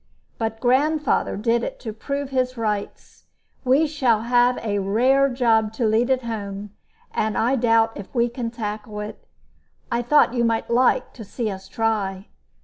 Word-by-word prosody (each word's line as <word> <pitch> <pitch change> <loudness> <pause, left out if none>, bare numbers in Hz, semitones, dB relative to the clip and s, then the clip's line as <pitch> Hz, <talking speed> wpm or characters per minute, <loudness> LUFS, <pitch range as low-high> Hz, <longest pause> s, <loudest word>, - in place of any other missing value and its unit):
But 225 -1 -2
grandfather 290 +4 +1
did 230 +2 +1
it - - -5
to 220 - -5
prove 280 +4 -4
his 255 -1 0
rights. 210 -3 -4 0.4
We 270 +4 +4
shall 260 -8 +1
have 245 +1 +3
a 205 -2 0
rare 255 +8 +3
job 225 -4 +2
to 230 +1 -1
lead 225 +3 +2
it 260 -1 +1
home, 205 -3 -5 0.4
and 215 0 -1
I 245 +4 +2
doubt 225 -2 +3
if 200 -3 -8
we 235 0 +3
can 240 -1 -4
tackle 210 -2 -5
it. 210 - -9 0.6
I 235 - +1
thought 250 +1 +4
you 240 -2 +1
might 230 0 0
like 250 +2 +2
to 230 - -9
see 220 +1 -3
us 190 0 -8
try." 200 -3 -2
230 Hz, 165 wpm, -23 LUFS, 215-250 Hz, 0.6 s, We